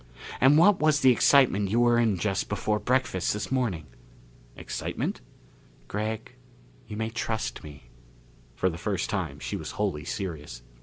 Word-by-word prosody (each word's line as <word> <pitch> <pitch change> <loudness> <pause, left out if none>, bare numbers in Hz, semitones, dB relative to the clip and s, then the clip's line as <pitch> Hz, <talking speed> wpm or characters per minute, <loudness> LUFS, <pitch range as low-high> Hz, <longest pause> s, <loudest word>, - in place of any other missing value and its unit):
And 135 +3 +6
what 185 +4 +5
was 155 -1 +3
the 130 - +7
excitement 120 -5 +4
you 115 +4 +2
were 120 -1 +4
in 110 -5 +2
just 95 +2 -1
before 105 +1 -1
breakfast 125 -8 0
this 105 +3 -5
morning?" 115 -12 -1 0.7
"Excitement?" - - -4 0.7
"Gregg, 110 +1 -4 0.5
you 105 - -7
may 110 0 -2
trust 110 -1 -3
me." 70 -5 -13 0.6
For 95 - +1
the 85 -2 -3
first - - -2
time - - -3
she - - -5
was - - -6
wholly 75 0 -1
serious. 75 - -5
105 Hz, 150 wpm, -27 LUFS, 95-125 Hz, 0.7 s, the